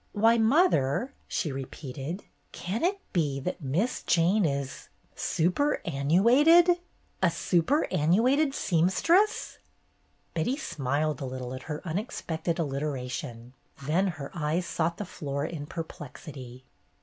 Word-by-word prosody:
"Why, 225 +2 +4
mother,'' 235 - +3
she 155 - -1
repeated, 135 +5 -6 0.3
''can 195 +6 -4
it 390 +3 +1
be 145 -6 +1
that 180 +5 -4
Miss 165 - -1
Jane 180 +4 +3
is 140 -2 -3
— - - -37
superannu 175 - +1
ated? 335 +7 +6 0.4
A - - +5
superannuated 250 - +2
seamstress? 205 - +2 0.3
" - - -41
Betty 170 - 0
smiled 150 - -1
a - - -2
little 130 -1 -5
at 130 - -6
her 150 -1 -4
unexpected 170 -2 -3
allit 140 -4 -2
eration, 125 -4 -4 0.3
then 175 +7 +2
her 160 -7 -5
eyes 165 +2 -1
sought 170 -1 -1
the 205 - -4
floor 140 -4 -4
in 150 -3 -5
perplexity. 140 -5 -8
165 Hz, 125 wpm, -28 LUFS, 140-215 Hz, 0.4 s, ated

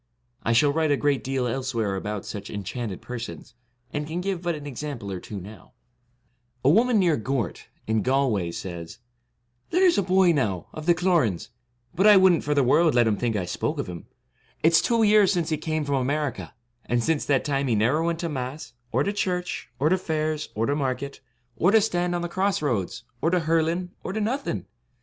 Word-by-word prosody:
I 115 - 0
shall 140 +5 +4
write 160 0 +1
a 145 - +3
great 145 -2 +1
deal 135 -1 -1
elsewhere 120 -5 -1
about 105 +1 -4
such 100 -1 -6
enchanted 105 0 -5
persons, 120 0 -7 0.4
and 150 0 -2
can 165 +3 -3
give 185 -1 -2
but 175 -2 -1
an 150 -1 -8
exam 145 +1 -5
ple 100 -3 -7
or 95 - -4
two 100 +2 -7
now, 100 +4 -12 0.9
A - - +7
woman 230 +5 +4
near 175 -6 +3
Gort, 120 -3 -3 0.2
in 110 0 +1
Galway, 125 -8 +1
says: 85 +3 -7 0.7
'There 370 +2 +3
is 350 - +4
a - - +3
boy, 185 -1 +4
now, 110 - 0
of 155 +1 -8
the 175 - +5
Cloran's; 165 - +1 0.4
but 190 +5 +3
I 210 -1 +9
would 190 -1 +6
n't 165 - 0
for 150 0 0
the 140 - +4
world 155 +4 +4
let 120 - +6
them 110 -2 +2
think 115 +1 -1
I 95 -3 -1
spoke 90 - -2
of - - -2
him; 85 -2 -8 0.6
it's 165 +1 +5
two 230 -1 +2
years 210 -2 +5
since 170 -4 0
he 155 - 0
came 155 0 -2
from 140 -2 0
America, 135 - -2 0.3
and 120 -1 +1
since 160 +1 +1
that 135 -3 +1
time 140 -1 0
he 120 - +2
never 120 +9 +2
went 170 0 0
to 170 - -1
Mass, 130 -2 -5 0.2
or - - +2
to 200 - -1
church, 180 -3 -2
or 145 +4 +2
to 185 +2 +2
fairs, 155 -3 -2
or 110 +2 0
to 140 - 0
market, 140 -1 -3 0.4
or 175 - +3
to 220 +2 +6
stand 175 -4 0
on 175 - -2
the - - -1
cross 190 0 0
roads, 115 -3 -1 0.2
or 165 - +2
to 180 0 +2
hurling, 165 +2 0
or - - -4
to 220 - -2
nothing. 255 +7 -2
145 Hz, 215 wpm, -25 LUFS, 120-175 Hz, 0.9 s, I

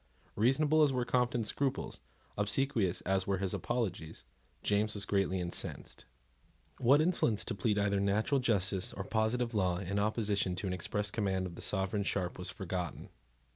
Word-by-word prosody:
Reasonable 145 +8 +3
as 150 -2 +5
were 125 -2 0
Compton's 120 -3 +1
scruples, 140 -2 -2 0.4
obsequious 105 -2 0
as 95 0 0
were 100 -1 +1
his 95 0 -2
apologies, 95 -9 -3 0.4
James 105 +1 +1
was 100 -1 -3
greatly 95 -2 +1
incensed. 85 -1 -5 0.7
What 135 +5 +5
insolence 155 - +1
to - - -2
plead 105 +1 0
either 100 -1 +2
natural 105 +8 +2
justice 100 -6 0
or 95 - -4
positive 115 +3 0
law 90 -4 +1
in 100 +2 -2
opposition 105 -3 0
to 90 - -3
an 95 - -1
express 100 +3 -2
command 95 -4 0
of 90 - -6
the - - -9
Sovereign 95 +1 0
Sharp 95 -3 -2
was 90 - -2
forgotten. 90 - -4
105 Hz, 160 wpm, -33 LUFS, 95-120 Hz, 0.7 s, as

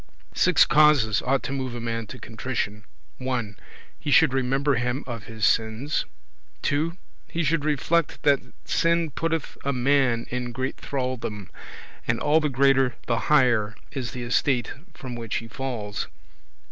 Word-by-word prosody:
Six - - +5
causes 145 -10 +4
ought 135 +1 +1
to - - -4
move 130 -3 -3
a - - -4
man 115 -1 -3
to 130 - -9
contrition: 110 -2 -4 0.3
1. 125 -6 -2 0.4
He 150 - -4
should 150 -1 +5
remember 135 +2 +1
him 125 +2 -1
of 115 -4 -6
his 110 -2 -1
sins; 115 +6 +1 0.6
2. 160 +5 0 0.3
He 170 - -2
should 155 0 +1
reflect 155 +2 0
that 140 -2 +5 0.3
sin 165 -1 +2
putteth 165 +1 -2
a 140 - 0
man 130 -2 +2
in 125 -1 -3
great 130 +2 -3
thraldom, 125 -7 -4 0.6
and 115 0 +1
all 150 +1 +4
the 150 -1 0
greater 135 -2 +3
the 115 -1 +1
higher 120 -8 +4 0.2
is 130 -4 -3
the 125 - -6
estate 120 +1 +1 0.2
from 130 -2 -7
which 115 -2 -4
he 115 - -3
falls; 115 -4 -4
3. - - -23
130 Hz, 155 wpm, -25 LUFS, 115-145 Hz, 0.6 s, Six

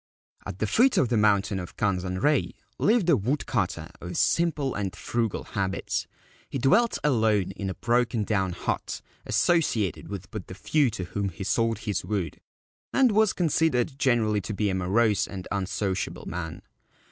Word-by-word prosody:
At 95 - -6
the 110 - 0
foot 245 - +3
of 125 - +3
the 120 - +1
mountain 105 -2 +2
of 90 - -8
Kanzanrei 95 +7 +1 0.3
lived 215 -3 +3
a 170 - +6
wood 130 +7 -1
cutter 90 -8 -2
of 85 +1 -5
simple 155 -6 +1
and 95 -2 -3
frugal 115 -1 -2
habits. 95 -3 -2 0.4
He - - -3
dwelt 205 - +3
alone 110 -8 +2
in 95 0 -4
a 95 - -4
broken 120 -2 +1
down 95 -4 0
hut, - - -3 0.2
associated 130 - +1
with 100 -2 -7
but 105 -4 -6
the 95 - -8
few 140 +8 +2
to 100 -4 -5
whom 100 +3 -2
he 95 +2 -7
sold 115 +2 +1
his 105 -4 -1
wood, 100 -5 -3 0.5
and 260 -3 +4
was 215 -1 +4
considered 155 -5 +1
generally 110 -5 +2
to 105 +3 -5
be 105 0 +1
a - - -2
morose 100 +3 +2
and 95 -2 -7
unsociable 95 -1 -2
man. 85 -3 -5
105 Hz, 165 wpm, -26 LUFS, 95-130 Hz, 0.5 s, a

